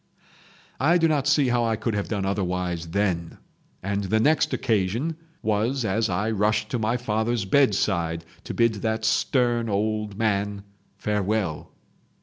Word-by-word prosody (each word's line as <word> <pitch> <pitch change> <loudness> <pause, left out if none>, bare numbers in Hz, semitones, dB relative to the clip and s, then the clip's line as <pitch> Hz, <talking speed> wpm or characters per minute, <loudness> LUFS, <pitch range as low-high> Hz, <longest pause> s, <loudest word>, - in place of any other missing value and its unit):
"I 165 +6 +4
do 165 -1 +3
not 145 -3 +1
see 145 -2 +3
how 120 -1 +2
I 115 -1 +1
could 110 +1 -2
have 105 -1 -2
done 100 -3 -2
otherwise 90 -3 -2
then. 85 -2 -1 0.5
And 100 +1 -1
the 110 +4 +1
next 150 +6 +3
occasion 115 - 0 0.3
was 110 +4 0
as 110 +2 +1
I 100 +5 0
rushed 105 0 +1
to 125 - -1
my 110 +3 +1
father's 110 -2 -1
bedside 85 -9 +1 0.2
to - - -5
bid 115 -1 +3
that 110 0 -1
stern 120 +1 +1
old 105 0 -1
man 100 -2 0 0.3
farewell. 105 -5 -1
110 Hz, 145 wpm, -25 LUFS, 100-120 Hz, 0.5 s, I